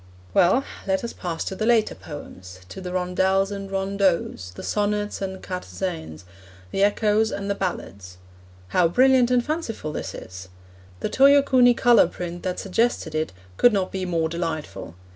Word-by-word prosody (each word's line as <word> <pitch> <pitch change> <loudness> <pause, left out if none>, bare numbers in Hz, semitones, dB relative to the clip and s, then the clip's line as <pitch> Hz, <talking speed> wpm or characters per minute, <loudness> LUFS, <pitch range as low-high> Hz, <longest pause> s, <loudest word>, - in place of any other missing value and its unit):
Well, 190 +10 +4 0.2
let 190 +2 0
us 235 - -4
pass 170 -3 -4
to - - -4
the 215 +3 -2
later 230 -3 +3
poems, 95 - -10
to 190 - -8
the 180 -1 -5
rondels 190 +2 +1
and 195 -1 -6
rondeaus, 195 - 0
the - - -8
sonnets 210 0 -1
and 190 -1 -5
quatorzains, 180 - -5 0.5
the 195 - -1
echoes 210 +1 +2
and 200 0 -3
the - - +2
ballades. 100 - -5 0.5
How 180 -2 +3
brilliant 255 +5 +4
and 250 -1 +2
fanciful 295 - -3
this - - -5
is! 95 0 -9 0.5
The - - -1
Toyokuni 265 -3 +5
colour 240 -7 +5
print 175 0 -6
that 180 -1 -3
suggested 200 -4 0
it 155 -4 -1 0.3
could 245 - +5
not 190 -2 0
be 190 -1 -3
more 165 -2 0
delightful. 160 - -5
190 Hz, 160 wpm, -24 LUFS, 170-215 Hz, 0.5 s, Toyokuni